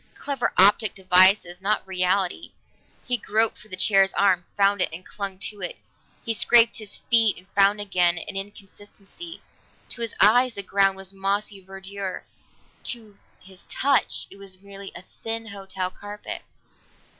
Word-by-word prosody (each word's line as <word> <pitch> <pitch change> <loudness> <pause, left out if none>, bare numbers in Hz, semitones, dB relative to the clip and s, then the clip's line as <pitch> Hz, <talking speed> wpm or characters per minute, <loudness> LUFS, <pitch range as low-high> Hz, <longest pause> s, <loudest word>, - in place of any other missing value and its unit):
Clever 270 -5 -2
optical 200 +1 +4
devices, 185 0 +4
not 210 +2 0
reality. 185 - 0 0.5
He 250 -1 +1
groped 220 0 +2
for 215 - -14
the 185 - -6
chair's 195 0 +4
arm, 185 -3 +2
found 200 -1 +3
it, - - +1
and 170 +3 -9
clung 200 -2 -6
to 200 +1 -6
it; 180 - -2 0.5
he 230 - 0
scraped 230 +1 +5
his 210 -2 -5
feet 225 -3 +4
and 185 - -16
found 200 +1 +3
again 180 -4 +2
an 195 - -6
inconsistency. 205 - -9 0.5
To 235 - -7
his 230 -2 -4
eyes 245 +4 +5
the 200 - -2
ground 195 0 +2
was 195 0 -6
mossy 195 0 -2
verdure; 195 0 -7 0.6
to 220 -4 -6 0.2
his 190 0 -16
touch 275 -1 +1
it 195 - -12
was 190 -2 -8
merely 200 0 -10
a 175 - -9
thin 225 +4 -7
hotel 195 -2 -5
carpet. 205 +1 -7
200 Hz, 155 wpm, -24 LUFS, 190-215 Hz, 0.6 s, scraped